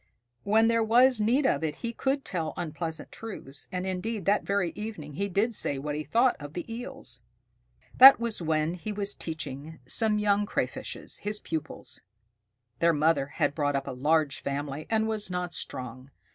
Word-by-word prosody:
When 220 +2 +4
there 230 0 +3
was 245 +1 +5
need 250 +7 +2
of 210 - +2
it, 150 -2 -1
he 235 - -2
could 270 +3 -1
tell 165 -4 -3
unpleasant 160 -1 -4
truths, 165 -11 -9
and 180 0 -3
indeed 190 +2 -3
that 205 +1 +3
very 200 -4 0
evening 210 -9 -7
he 200 +7 -2
did 210 +5 +1
say 145 -8 -1
what 145 +2 -3
he 150 +1 -3
thought 240 +8 +3
of 145 0 -8
the 175 - -4
Eels. 135 - -7 0.8
That 270 0 +11
was 235 -5 -2
when 160 0 0
he 180 +4 -5
was 205 0 0
teaching 160 -1 -6
some 210 - +2
young 205 0 +2
Crayfishes, - - -3
his 210 0 -3
pupils. 160 -2 -6 0.8
Their 170 0 +4
mother 150 -2 +2
had 145 0 0
brought 145 -2 0
up 135 0 -1
a - - -4
large 145 +2 +1
family, 140 +1 -4
and 220 -1 +2
was 215 -3 -1
not 180 -1 -3
strong. 130 +1 -6
180 Hz, 175 wpm, -28 LUFS, 150-215 Hz, 0.8 s, That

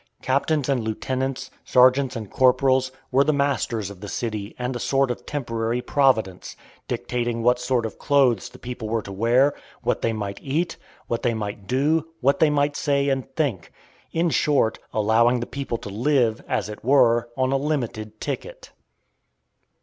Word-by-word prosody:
Captains 140 +2 +1
and 135 -4 +1
lieutenants, 130 +4 -3
sergeants 130 +1 +4
and 110 -4 -6
corporals, 130 0 +3 0.2
were 135 +2 +5
the 155 - +2
masters 130 -7 -1
of 95 -2 -13
the 105 - -6
city 105 -1 -4
and 125 +1 -3
a - - -3
sort 135 +1 +1
of 120 - -7
temporary 115 -4 -2
Providence, 125 -7 +1 0.3
dictating 120 -1 -2
what 125 +1 +3
sort 125 -2 0
of 110 - -6
clothes 130 - +2
the - - -14
people 120 -3 -6
were 115 -1 -1
to 100 - -8
wear, 120 +8 +3 0.3
what - - 0
they 115 - +1
might 100 -3 -4
eat, 160 +6 -1 0.3
what 115 - -2
they 120 -1 +1
might 100 -2 -5
do, 150 +6 +1
what 140 +2 +2
they 160 - +5
might 145 0 +1
say 140 -1 +1
and 135 -1 -1
think; 135 - -1 0.4
in 165 0 +1
short, 140 -8 +2
allowing 115 +3 +3
the 120 - -3
people 140 -3 -4
to 105 - -8
live, 120 +1 +1
as 100 - -1
it 105 0 -9
were, 120 -2 +4
on 130 0 +1
a 135 - +3
"limited" 120 -7 -3
ticket. - - -6
125 Hz, 170 wpm, -23 LUFS, 115-140 Hz, 0.4 s, were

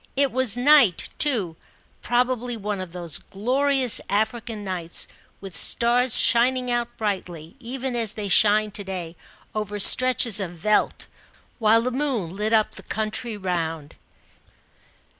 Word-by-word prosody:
It 275 -1 +2
was 250 -3 0
night 255 - +4
too; 215 - +1 0.5
probably 245 -1 -1
one 205 -2 -4
of 185 -2 -8
those 170 -3 -3
glorious 255 +4 +1
African 220 +1 -2
nights, 180 -4 -4 0.3
with 195 -2 -9
stars 245 0 +3
shining 250 +1 +2
out 240 0 -3
brightly, 180 -5 -5
even 255 +1 -5
as 225 -3 -1
they 210 -2 -5
shine 210 +2 +3
to 205 - -6
day 180 -3 -7 0.4
over 210 -1 -4
stretches 245 -1 +6
of 185 -3 -5
veldt, 210 +5 0 0.5
while 225 0 +3
the 255 - -2
moon 245 - -3
lit 210 +2 -3
up 220 -2 +2
the - - -9
country 220 +1 -4
round. 165 -5 -4
220 Hz, 135 wpm, -23 LUFS, 195-245 Hz, 0.5 s, stretches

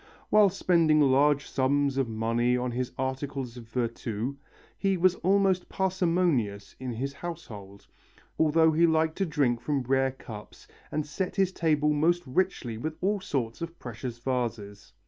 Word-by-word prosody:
While 210 -1 +6
spending 170 -4 +3
large 140 +1 +3
sums 140 +1 +1
of 135 -3 0
money 115 +2 +1
on 125 0 -2
his 125 +1 -3
articles 130 -1 -3
of 120 -2 -10
virtu, 115 +1 -3 0.4
he 195 -1 0
was 180 +1 +4
almost 190 -1 +2
parsimonious 170 - 0
in 130 -2 -4
his 135 +5 -3
household, 115 - -8 0.5
although 160 +1 +4
he 165 +2 +4
liked 160 0 +2
to 195 - 0
drink 135 -7 +1
from 135 +1 -1
rare 135 +1 +2
cups 110 -5 -11 0.2
and 155 0 -1
set 180 +5 -3
his 195 -2 +2
table 150 -4 +1
most 170 +4 +2
richly 130 -6 -1
with 155 +5 -4
all 200 +2 0
sorts 130 - -3
of 170 0 -6
precious 120 0 -6
vases. 115 -5 -4
140 Hz, 150 wpm, -28 LUFS, 120-170 Hz, 0.5 s, While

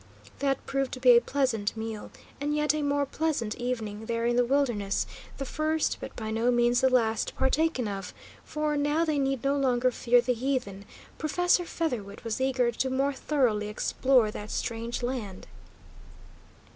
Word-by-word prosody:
That 275 -1 0
proved 275 -1 -1
to 255 - -5
be 250 -1 +7
a 235 - +6
pleasant 240 -7 -1
meal, 220 -1 -5 0.3
and 295 +1 -1
yet 300 0 +2
a 305 - -1
more 285 0 +1
pleasant 275 -7 -1
evening 225 -3 -4
there 230 0 -1
in 240 0 +2
the 245 - +4
wilderness, 240 -7 0 0.3
the 275 - -4
first, 310 +3 0
but - - -7
by 220 -1 -4
no 225 +2 +1
means 240 0 +3
the 265 - +4
last, 225 -3 +1
partaken 265 -2 +1
of, 195 -2 -5 0.3
for, 300 0 -2
now 295 +3 +1
they 305 -3 0
need 270 -3 0
no 275 +1 +2
longer 255 -2 +2
fear 245 0 +3
the 250 +1 +1
heathen, 235 -6 -2 0.3
Professor 355 +3 +2
Featherwit 240 -14 -3
was 230 +2 -3
eager 255 -2 +2
to 260 +3 -1
more 270 +2 +1
thoroughly 250 -7 0
explore 230 +2 +2
that 210 0 -7
strange 230 +1 -3
land. 235 -7 -4
250 Hz, 170 wpm, -28 LUFS, 225-280 Hz, 0.3 s, be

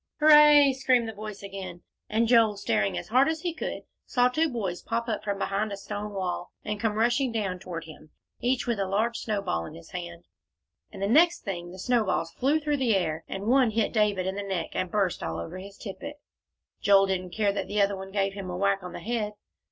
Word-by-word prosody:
"Hooray!" 300 -2 +8
screamed 255 -3 +2
the 225 - -5
voice 210 -1 -8
again, 190 -3 -7 0.3
and 225 +2 +2
Joel, 225 -3 +4
staring 195 -1 0
as - - -6
hard 255 +6 +4
as 320 -1 -2
he 345 -1 -2
could, 315 - -5 0.2
saw 245 -1 +3
two 315 +5 +1
boys 195 -9 -3
pop 235 +1 -2
up 220 -3 -2
from 200 -1 -2
behind 200 +2 -1
a 200 - -4
stone 205 +1 -6
wall, 180 -2 -3 0.2
and 210 0 -3
come 215 -1 0
rushing 240 +3 +2
down 200 -5 -2
toward 175 -3 -6
him, 155 -1 -13 0.3
each 250 +1 0
with 235 -4 -1
a 195 - 0
large 220 +5 0
snowball 200 - -2
in 155 - -10
his 165 0 -13
hand. 175 -1 -7 0.7
And 195 - -6
the - - +2
next 340 +9 +4
thing, 175 -3 -5
the 185 - -10
snowballs 200 -6 0
flew 280 - +1
through 295 -1 0
the 245 -6 +2
air, 160 -4 -1
and 195 +1 -5
one 255 +1 +4
hit 220 0 0
David 210 -4 +2
in 190 - -1
the 200 - -4
neck, 190 -5 -3
and 185 - -2
burst 195 -2 0
all 80 0 -3
over 85 - -6
his 200 +1 -11
tippet. 285 +8 -7 0.7
Joel 195 -1 +6
didn't 185 -1 -2
care 210 -2 +2
that - - -3
the 210 +1 -1
other 200 0 +3
one 190 0 -8
gave 195 -1 0
him 195 -2 -6
a 180 - -4
whack 200 0 +1
on 180 - -8
the - - -7
head. 220 -2 -2
205 Hz, 225 wpm, -27 LUFS, 190-235 Hz, 0.7 s, Hooray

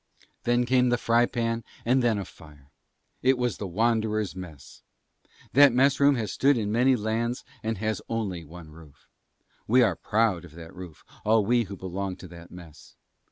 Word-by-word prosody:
Then 120 +1 +2
came 125 0 +3
the 120 - +2
fry 120 0 +2
pan 115 -1 -2 0.2
and 130 +3 +3
then 115 -3 +2
a 100 - -4
fire: 75 -5 -17 0.5
it 130 0 +3
was 125 -1 -1
the 100 - -5
Wanderers' 110 0 0
Mess. 85 -7 -11 0.7
That 140 -1 +7
mess 135 +3 +3
room 140 0 +5
has 110 -4 -3
stood 140 -1 +3
in 105 -2 -2
many 125 +4 +3
lands 115 +2 -2 0.2
and 110 -1 -3
has 110 +2 -2
only 100 -7 -3
one 80 0 -12
roof. 75 -2 -17 0.6
We 125 +3 +5
are 100 -7 +2
proud 105 -2 0
of 85 -3 -14
that 80 -1 -11
roof, 90 -4 -11 0.2
all 110 -1 +3
we 120 +1 +2
who 100 0 -8
belong 95 +1 -4
to 90 - -12
that 85 0 -12
Mess. 80 -5 -14
110 Hz, 180 wpm, -26 LUFS, 90-120 Hz, 0.7 s, That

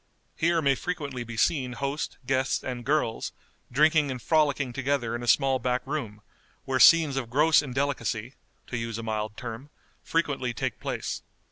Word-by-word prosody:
Here 165 0 +2
may 140 -1 +4
frequently 140 -5 -4
be 115 -1 -8
seen 130 -3 +1
host, 140 +4 -3
guests, 130 +1 0
and 125 -2 -4
girls, 140 -4 0 0.4
drinking 150 +2 +4
and 130 -1 -4
frolicking 145 -3 +1
together 135 -3 -1
in 120 - -4
a 120 - -6
small 135 0 +3
back 125 +1 -1
room, 115 -8 -4 0.4
where 130 -1 0
scenes 155 -2 +7
of 125 -4 -3
gross 150 +5 +5
indelicacy 130 -4 -2 0.3
(to 125 - -4
use 115 -1 -3
a 115 - -5
mild 110 -1 -3
term) 125 +3 -7 0.3
frequently 140 -7 -1
take - - -3
place. - - -4
130 Hz, 160 wpm, -27 LUFS, 120-145 Hz, 0.4 s, scenes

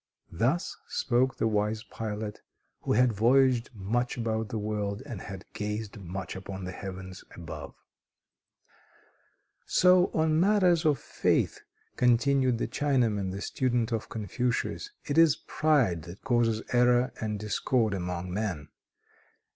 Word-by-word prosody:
Thus 125 - 0
spoke 130 0 +1
the - - +1
wise 105 0 0
pilot, 105 -3 -5 0.4
who - - -1
had 125 +1 +4
voyaged 125 +2 +3
much 120 +6 -1
about 110 -2 -1
the 115 - -3
world, 105 +1 -3
and 120 -9 -6
had 95 -2 -8
gazed 105 0 -4
much 90 -1 -6
upon 95 0 -7
the 90 - -4
heavens 95 -1 -8
above. 85 -2 -8 1.9
"So 180 +1 +5
on 155 0 +2
matters 180 -3 +4
of 150 -3 +4
faith," - - 0 0.4
continued 125 +1 +3
the 115 - -1
Chinaman, 115 -8 +1
the 100 +1 -5
student 120 -2 0
of 115 -2 -2
Confucius, 120 - -2 0.2
"it 145 +3 +2
is 165 -3 +6
pride 135 - +1
that 85 +4 -11
causes 115 -3 +1
error 125 +1 +4
and 105 -2 -2
discord 105 +2 0
among 90 -1 -3
men. 95 -8 -3
115 Hz, 130 wpm, -28 LUFS, 100-130 Hz, 1.9 s, is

